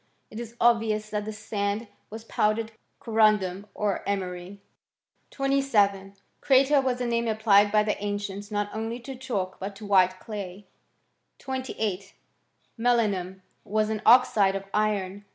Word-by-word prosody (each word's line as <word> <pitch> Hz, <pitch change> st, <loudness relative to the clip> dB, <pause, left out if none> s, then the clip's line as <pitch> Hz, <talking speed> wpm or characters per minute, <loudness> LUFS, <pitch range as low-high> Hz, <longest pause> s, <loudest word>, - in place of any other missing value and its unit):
It 215 Hz, -, -7 dB
is 235 Hz, 0 st, -8 dB
obvious 220 Hz, -2 st, +2 dB
that 210 Hz, -1 st, -2 dB
this 215 Hz, -1 st, -6 dB
sand 210 Hz, +1 st, -3 dB, 0.2 s
was 220 Hz, +1 st, -8 dB
powdered 220 Hz, 0 st, 0 dB, 0.3 s
corundum, 210 Hz, -4 st, +2 dB
or 205 Hz, -2 st, -1 dB
emery. 185 Hz, 0 st, -4 dB, 0.7 s
27. 210 Hz, -9 st, +1 dB, 0.3 s
Creta 275 Hz, +1 st, +4 dB
was 255 Hz, -1 st, -1 dB
a -, -, 0 dB
name 235 Hz, 0 st, 0 dB
applied 210 Hz, -2 st, +4 dB
by 210 Hz, 0 st, +4 dB
the 210 Hz, -1 st, -2 dB
ancients 205 Hz, 0 st, -4 dB
not 205 Hz, -1 st, -2 dB
only 225 Hz, +2 st, -4 dB
to 270 Hz, +3 st, -7 dB
chalk, 205 Hz, -8 st, -4 dB
but 195 Hz, +1 st, -5 dB
to 210 Hz, -, -10 dB
white 185 Hz, -2 st, +3 dB
clay. 200 Hz, -3 st, -7 dB, 0.7 s
28. 220 Hz, -7 st, -4 dB, 0.6 s
Melinum 205 Hz, -6 st, 0 dB, 0.2 s
was 215 Hz, +1 st, 0 dB
an 215 Hz, -1 st, -3 dB
oxide 215 Hz, -5 st, +5 dB
of 195 Hz, 0 st, -4 dB
iron. 205 Hz, -2 st, -1 dB
210 Hz, 135 wpm, -26 LUFS, 200-230 Hz, 0.7 s, oxide